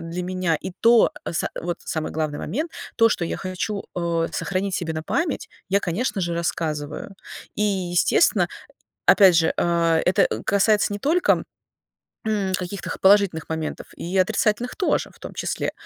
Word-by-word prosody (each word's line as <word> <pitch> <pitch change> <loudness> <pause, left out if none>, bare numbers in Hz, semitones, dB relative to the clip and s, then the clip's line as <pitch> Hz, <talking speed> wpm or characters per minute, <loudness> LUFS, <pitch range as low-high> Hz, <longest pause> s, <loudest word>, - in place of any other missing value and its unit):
для 165 +2 -4
меня, 180 -2 0
и - - -6
то 230 +3 +6 0.2
са 165 - -1
вот 175 0 -3
самый 160 -1 -3
главный 155 -2 -2
момент: 305 - -3 0.3
то, 230 -1 +6
что 175 - -1
я - - -3
хочу, 195 +2 -3
э, 170 -1 0
сохранить 195 0 -2
себе 165 -2 -2
на 155 - -4
память, 320 - -2 0.2
я, 200 +1 +3
конечно 200 +4 -1
же, 170 -1 -1
рассказываю. 155 0 -3 0.4
И, 210 - -1
естественно, 185 -4 +2 0.6
опять 190 -4 +7
же, 165 -1 +3
э, 170 -1 +2
это 180 - +4 0.2
касается 205 +1 +3
не 205 - -4
только, 335 - +2 0.8
м, 205 -3 0
каких-то 185 +1 -5
х - - -5
положительных 195 -4 +4
моментов. 160 -1 -4
И 175 +3 -4
отрицательных 215 +4 +1
тоже 380 - 0
в - - -21
том - - -9
числе. - - -2
185 Hz, 160 wpm, -23 LUFS, 170-205 Hz, 0.8 s, опять